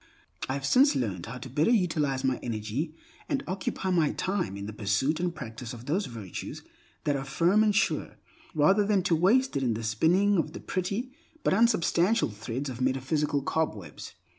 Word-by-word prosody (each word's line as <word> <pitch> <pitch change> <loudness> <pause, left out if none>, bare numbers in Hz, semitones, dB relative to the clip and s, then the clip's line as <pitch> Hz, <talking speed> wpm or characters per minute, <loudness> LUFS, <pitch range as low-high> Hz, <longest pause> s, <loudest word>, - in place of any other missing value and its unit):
I - - 0
have 140 -1 -4
since 270 - +5
learned 100 -7 -2
how 120 +3 -6
better 135 +4 -1
to - - +3
utilize 150 -8 0
my 130 -2 +1
energy 115 +8 -3 0.3
and 280 -2 0
occupy 190 0 -2
my 165 -5 +2
time 185 - -2
in 100 - -6
the 105 - -6
pursuit 105 +10 0
and 175 -1 -1
practice 115 -3 -7
of 120 0 -10
those 185 +9 0
virtues 110 -7 -7 0.4
that 145 - +1
are 135 - -2
firm 170 +10 +3
and 210 -2 +2
sure, - - 0 0.4
rather 190 +8 +4
than 200 -2 +2
to 175 -2 +2
waste 225 - +3
it 140 - +1
in 120 -4 +1
the 115 - -5
spinning 175 - +3
of - - -2
the - - -6
pretty 200 +7 -3 0.3
but - - +2
unsubstantial 215 - +3
threads 115 +6 -5
of 130 -1 -6
metaphysical 135 +2 0
cobwebs. 105 - -3
150 Hz, 185 wpm, -28 LUFS, 120-190 Hz, 0.4 s, since